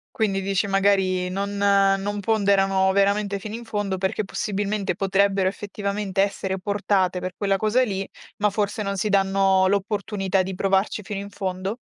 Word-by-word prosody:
Quindi 195 -3 0
dici 195 +1 0
magari 195 -2 +2
non 200 +2 -3
non 200 0 +2
ponderano 195 -2 +2
veramente 200 +1 +1
fino 215 +2 -6
in 235 - -7
fondo 205 -4 -2
perché 190 +3 -1
possibilmente 205 0 -2
potrebbero 195 0 +1
effettivamente 200 0 -2
essere 190 -1 -1
portate 195 -2 0
per 185 0 -4
quella 195 -1 +1
cosa 215 +5 +2
lì, 195 -4 -2 0.3
ma 210 0 +2
forse 205 +1 -2
non 200 0 -3
si 210 +3 0
danno 195 -1 +3
l'opportunità 200 -1 0
di 190 +1 -5
provarci 195 +2 0
fino 200 0 -5
in 200 - -8
fondo? 190 +2 -4
195 Hz, 155 wpm, -23 LUFS, 190-205 Hz, 0.3 s, danno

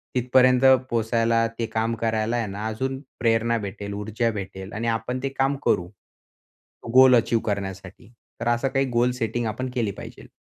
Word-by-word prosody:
तिथपर्यंत 125 +1 +4 0.2
पोहचायला 115 0 +1
ते 115 - 0
काम 115 0 -1
करायला 110 0 0
आहे 115 -2 -1
ना, 100 +2 -6
अजून 130 +5 -3 0.2
प्रेरणा 115 0 +2
भेटेल, 100 -1 -6
ऊर्जा 110 +3 -1
भेटेल 95 -1 -7
आणि 115 +3 -3
आपण 115 +3 -2
ते 135 - 0
काम 135 +1 +2
करू, 90 - +2 1.1
गोल 130 0 +8
अचीव 115 -1 +2
करण्यासाठी. 100 +2 -5 0.3
तर 115 - -2
असं 120 +3 +1
काही 135 0 +1
गोल 120 +1 +2
सेटिंग 120 -1 -2
आपण 130 +4 -3
केली 115 -5 -1
पाहिजेल. - - -11
115 Hz, 160 wpm, -24 LUFS, 110-125 Hz, 1.1 s, गोल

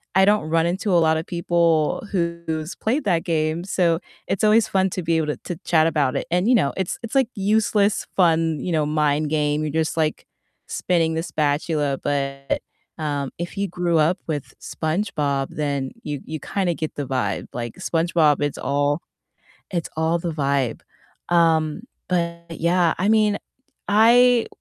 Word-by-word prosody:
I 190 0 +6
don't 205 -6 +2
run 165 0 +2
into 190 +4 -1
a 170 - +5
lotta 160 0 +2
people 170 -1 +1
who's 170 -3 -2
played 265 +6 -1
that 170 -4 +1
game, 160 0 0
so 170 -4 +1 0.3
it's 195 - -1
always 215 +1 +5
fun 190 0 +2
to 185 - -3
be 165 0 +1
able 155 -2 0
to 150 - -2
to 175 - -4
chat 160 -2 +4
about 145 -5 +1
it. - - -4
And, 180 +6 +1
you 255 - +6
know, 140 -10 +2
it's 190 -2 -2
it's 230 +3 -7
like 265 -4 +3
useless 205 0 +2
fun, 165 -3 +3
you 175 +5 -3
know, 155 -2 +2
mind 150 0 +1
game. 150 -1 +1
You're 150 - -2
just 160 +1 -1
like 155 -1 -1 0.4
spinning 165 -3 0
the 165 +1 -2
spatula, 145 -2 0
but, 140 -1 -2 0.4
um, 145 -3 -2
if 175 +3 -6
you 200 0 0
grew 175 -2 0
up 165 +4 +3
with 150 -4 -4
SpongeBob, 150 -5 -1
then 140 -3 -2
you 145 -2 -4
you 155 0 -5
kinda 185 -4 -1
get 155 -1 -5
the 145 - -3
vibe. 130 -2 -2
Like, 120 -1 -5
SpongeBob, 165 -3 +2
it's 145 -1 -1
all 145 +2 0 0.7
it's 170 -3 -3
all 160 +2 +1
the 170 -1 -3
vibe. 140 -5 0 0.5
Um, 165 +1 +2 0.3
but 170 -1 -1
yeah, 170 0 +2
I 195 +3 +1
mean, 215 -2 +3 0.5
I 235 +3 +5
165 Hz, 170 wpm, -22 LUFS, 150-180 Hz, 0.7 s, I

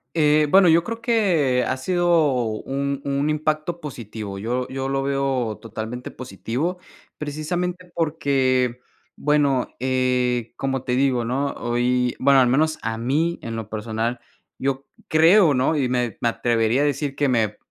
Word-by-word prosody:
Eh, 150 -1 +4
bueno, 190 -2 +7
yo 165 +1 +5
creo 230 +4 -5
que 175 - +2
ha 130 - 0
sido 170 -2 +2
un 140 +5 -3
un 140 +1 0
impacto 155 +2 -1
positivo. 110 -8 -7
Yo 125 +5 -2
yo 135 0 -4
lo 135 0 0
veo 135 -5 -1
totalmente 115 +2 -6
positivo, 130 - -4 0.4
precisamente 175 +4 -4
porque, 130 -6 +1 0.4
bueno, 145 -3 +1
eh, 125 -2 0
como 135 -1 -2
te 125 -1 -1
digo, 130 -3 +1
¿no?, 135 +4 -1
hoy, 125 +1 0
bueno, 135 0 +5
al 125 - +4
menos 155 +5 +2
a 115 0 -2
mí, 155 +8 0
en 115 0 -5
lo 110 -2 -6
personal, 110 +2 -3 0.4
yo 135 0 -2 0.2
creo, 165 -1 +5
¿no?, 130 +5 +2
y 135 -4 0
me 125 -4 -1
me 120 - +2
atrevería 115 +2 +1
a - - +3
decir 140 -1 -1
que 145 -1 +1
me 110 -4 +1
135 Hz, 155 wpm, -22 LUFS, 120-150 Hz, 0.4 s, bueno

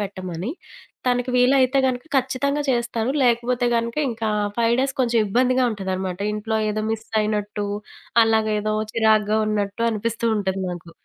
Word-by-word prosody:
పెట్టమని. 185 0 -4 0.6
తనకి 250 0 +1
వీలైతే 260 +1 +4
గనక 250 +1 -2
ఖచ్చితంగా 280 +3 0
చేస్తాను. 235 0 -1
లేకపోతే 245 0 +2
గనక 230 +2 -2
ఇంకా 225 -1 -2 0.3
5 230 0 +3
డేస్ 270 0 -1
కొంచెం 235 -2 +2
ఇబ్బందిగా 255 +4 +2
ఉంటదనమాట. 190 -2 -3 0.2
ఇంట్లో 220 +1 -2
ఏదో 215 0 -2
మిస్సయినట్టు, 210 -2 -2 0.6
అలాగ 220 -1 +2
ఏదో 215 0 -1 0.2
చిరాగ్గా 215 -1 +3
ఉన్నట్టు 205 +2 -1
అనిపిస్తూ 230 +1 -2
ఉంటుంది 190 -1 -1
నాకు. 170 -1 -8
225 Hz, 130 wpm, -22 LUFS, 210-245 Hz, 0.6 s, వీలైతే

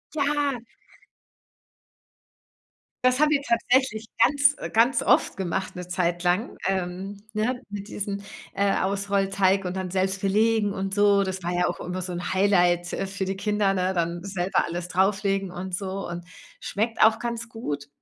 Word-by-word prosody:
Ja. 285 -3 0 2.4
Das 255 +2 +4
haben 305 0 +4
wir 285 -2 +3
tatsächlich 235 -2 +1 0.2
ganz 285 0 +4
äh, - - -5
ganz 235 +5 +3
oft - - +3
gemacht, 190 0 -3
'ne 180 0 -6
Zeit 175 -1 -1
lang, 180 +7 +1
ähm, 190 +1 -2 0.2
ne, 245 +4 0
mit 205 0 -6
diesem, 200 -1 -4 0.3
äh, 200 0 +2
Ausrollteig 195 -1 +1
und 180 +1 -3
dann 185 -1 -3
selbst 190 +1 -1
belegen 210 +1 +2
und 195 0 -3
so. 205 -1 +4
Das 190 -1 -4
war 175 - -1
ja 180 0 +1
auch - - -4
immer 180 0 -4
so 180 - -5
'n 175 +1 -4
Highlight, 175 -3 +3
äh, 195 - -2
für 195 0 -3
die 195 +1 -2
Kinder, 205 0 +1
ne, 185 0 0
dann 170 +1 -1
selber 190 -2 0
alles 175 +1 -4
drauflegen 195 +1 +1
und 180 0 -4
so 195 +1 -4
und 175 0 -6 0.3
schmeckt 225 +3 -2
auch 220 0 +6
ganz 235 -1 -4
gut. 145 -11 -5
195 Hz, 165 wpm, -25 LUFS, 180-215 Hz, 2.4 s, auch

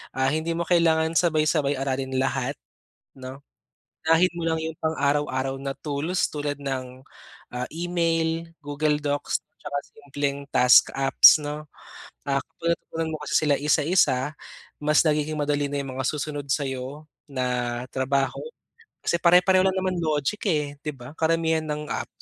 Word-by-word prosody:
Ah, 135 +1 +1
hindi 160 +2 -1
mo 170 - 0
kailangan 165 -2 +3
sabay-sabay 155 -4 +2
aralin 135 -1 -2
lahat, 135 +1 -1 0.6
'no? 130 +1 -9 0.7
Unahin 165 +3 +4
mo 170 - -4
lang 160 0 0
yung 160 0 -4
pang-araw-araw 140 -3 0
na 135 0 -4
tools, 155 +5 -1
tulad 145 -1 -3
ng, 130 -2 -5 0.5
ah, 125 - -2
email, 165 -1 0 0.2
Google 150 +1 0
Docs, 145 0 -1 0.2
tsaka 145 -1 -5
simpleng 140 0 -4
task 125 0 +6
apps, 135 +3 +7
'no? 150 +1 -5 0.6
Ah, 140 0 +1
kung 170 +4 -3
natutunan 165 -1 -5
mo - - -4
kasi - - -2
sila 145 - +3
isa-isa, 150 -2 +2 0.5
mas 150 0 +4
nagiging 150 0 0
madali 145 -1 0
na 145 - -2
yung 135 -2 -6
mga - - -1
susunod 145 -1 -4
sa'yo 135 +2 -3 0.2
na 125 -2 -2
trabaho. 135 +1 0 0.6
Kasi - - +2
pare-pareho 180 +2 +5
lang 190 0 +1
naman 185 -1 -1
logic, 155 +3 -1
eh, 150 -3 -1
'di 150 -1 -3
ba? 125 +2 -11
Karamihan 160 0 +1
ng 150 0 -3
apps. - - -3
145 Hz, 145 wpm, -25 LUFS, 135-160 Hz, 0.7 s, apps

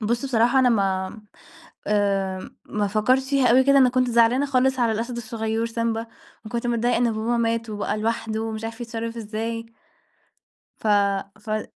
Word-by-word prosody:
بُص، 235 +4 -1
بصراحة 240 0 +3
أنا 260 -1 +5
ما 195 -2 0 0.7
آآ، 195 -2 0
ما 210 -1 -2
فكرتش 255 +6 +1
فيها 275 -3 +3
أوي 255 +2 +5
كده 275 0 +5
أنا 255 -2 +6
كنت 250 0 +1
زعلانة 235 +4 +3
خالص 260 -1 +2
على 230 -2 +2
الأسد 235 +3 -3
الصغيور 225 -1 -2
سيمبا 230 0 -2 0.4
وكنت 235 +3 -3
متضايقة 240 0 +1
إن 235 -1 +2
باباه 220 +2 -1
مات 230 -1 -1
وبقى 210 0 -2
لوحده 220 0 -2
ومش 220 0 -4
عارف 225 +1 -6
يتصرَّف 230 -1 -5
إزاي. 230 +1 -4 1.1
ف - - -6 0.5
ف 215 +1 -4
230 Hz, 160 wpm, -23 LUFS, 215-240 Hz, 1.1 s, أنا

